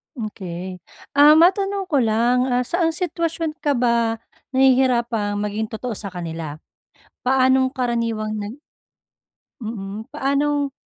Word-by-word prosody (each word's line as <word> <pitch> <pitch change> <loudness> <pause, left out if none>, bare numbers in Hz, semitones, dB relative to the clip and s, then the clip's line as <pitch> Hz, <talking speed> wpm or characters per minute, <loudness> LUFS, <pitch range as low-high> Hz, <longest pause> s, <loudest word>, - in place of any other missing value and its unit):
Okey. 185 -5 -6 0.3
Ah, 295 +2 +7
matanong 390 +4 +3
ko 280 - +4
lang, 240 +3 +2
ah, 250 0 +1
saan 330 +3 0
sitwasyon 330 -2 -2
ka 290 -2 +1
ba 235 -2 +2 0.4
nahihirapang 240 -5 +3
maging 210 +1 -2
totoo 235 +3 -5
sa 205 -1 -5
kanila? 165 -4 -6 0.7
Paanong 260 0 +3
karaniwang 230 -4 -2
nag 210 +7 -6 1.0
mm, 215 -1 -6
paanong 285 0 0
245 Hz, 110 wpm, -21 LUFS, 215-285 Hz, 1.0 s, Ah